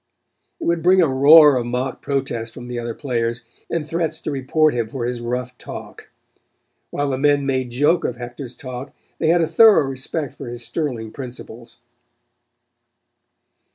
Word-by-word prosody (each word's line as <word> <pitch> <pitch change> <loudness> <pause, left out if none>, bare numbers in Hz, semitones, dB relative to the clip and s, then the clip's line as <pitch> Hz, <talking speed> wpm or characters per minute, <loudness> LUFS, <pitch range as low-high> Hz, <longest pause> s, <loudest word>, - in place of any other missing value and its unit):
It - - -7
would 170 -1 +1
bring 185 +3 +5
a 170 - +5
roar 145 +2 +7
of 120 -1 -2
mock 125 +2 -3
protest 120 -5 -3
from 120 - -9
the 120 -1 -3
other 115 -1 -5
players, 120 -4 -2 0.3
and 160 -3 -2
threats 160 -1 -2
to - - -3
report 145 +3 +2
him 120 -2 -1
for 120 +1 -4
his 120 -1 -3
rough 125 +1 -3
talk. - - -10 0.8
While 145 -1 -2
the 130 - -2
men 145 0 +3
made 130 -2 -1
joke 145 +8 +2
of 120 - -2
Hector's 120 +1 -8
talk 130 +1 -8 0.2
they 160 - 0
had 170 +2 +4
a 165 - +1
thorough 205 0 +6
respect 135 +3 -4
for - - -9
his 120 0 -6
sterling 120 -9 -3
principles. 120 -2 -9
130 Hz, 165 wpm, -21 LUFS, 120-150 Hz, 0.8 s, roar